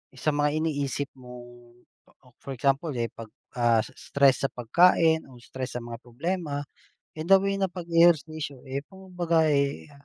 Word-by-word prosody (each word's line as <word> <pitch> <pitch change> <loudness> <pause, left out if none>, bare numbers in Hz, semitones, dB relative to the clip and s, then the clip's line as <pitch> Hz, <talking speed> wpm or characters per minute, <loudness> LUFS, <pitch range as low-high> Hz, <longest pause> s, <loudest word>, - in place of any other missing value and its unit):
sa 145 +4 0
mga 145 0 +1
iniisip 145 -2 -2
mong, 120 -1 -13 0.7
for 140 - -6
example, 135 +4 0
eh, 120 -1 -1
'pag, 115 - -10 0.3
ah, 120 -1 +4
is 110 - -4
stress 140 -1 +2
sa 135 - +2
pagkain 160 +5 +3
o 130 - -15
stress 130 +1 -7
sa - - -10
mga 115 -1 -8
problema, 145 +3 -3 0.5
eh, 155 +1 -6
the 195 - +7
way 195 +1 -1
na 195 - +2
pag-e-ehersisyo, 165 -5 +1
eh, 135 +1 -4
kumbaga, 175 -4 -1
eh, 140 0 0
145 Hz, 155 wpm, -26 LUFS, 125-165 Hz, 0.7 s, the